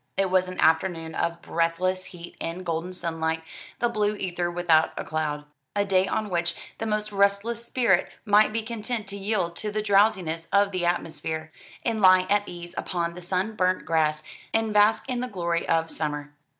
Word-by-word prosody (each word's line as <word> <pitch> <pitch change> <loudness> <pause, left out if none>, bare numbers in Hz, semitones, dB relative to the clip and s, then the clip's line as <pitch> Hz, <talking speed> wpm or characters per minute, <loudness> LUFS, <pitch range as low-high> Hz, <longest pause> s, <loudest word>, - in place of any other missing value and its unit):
It 195 -1 +1
was 185 0 +3
an 185 - -7
afternoon 165 0 +2
of 170 +1 -2
breathless 180 +3 0
heat 175 -1 -10
and 170 +3 -4
golden 170 +1 -2
sunlight, 165 -2 -2 0.3
the 240 - +2
blue 210 -2 0
ether 175 -3 -2
without 170 -2 +3
a - - -2
cloud 150 -2 -2 0.3
a 205 0 +2
day 190 -1 +3
on 215 -2 -2
which 170 -1 +1 0.2
the 225 - -2
most 210 0 -1
restless 200 +4 +1
spirit 235 -7 +2 0.2
might 210 0 +5
be 225 +1 -1
content 225 0 -3
to 200 - -6
yield 195 -4 -1
to 215 - -2
the 210 0 -2
drowsiness 195 -5 +2
of 200 +1 +4
the 180 -2 0
atmosphere, 160 -2 -2 0.3
and 225 -2 0
lie 185 -1 +7
at 205 0 +2
ease 175 -1 -8
upon 170 -2 -2
the 180 - -9
sunburnt 185 +1 0
grass 155 -2 +1 0.3
and 225 -1 +1
bask 210 +4 +4
in 250 -2 -1
the 250 - -2
glory 170 -6 -2
of 165 0 +1
summer. 150 -1 -3
185 Hz, 180 wpm, -26 LUFS, 165-210 Hz, 0.3 s, lie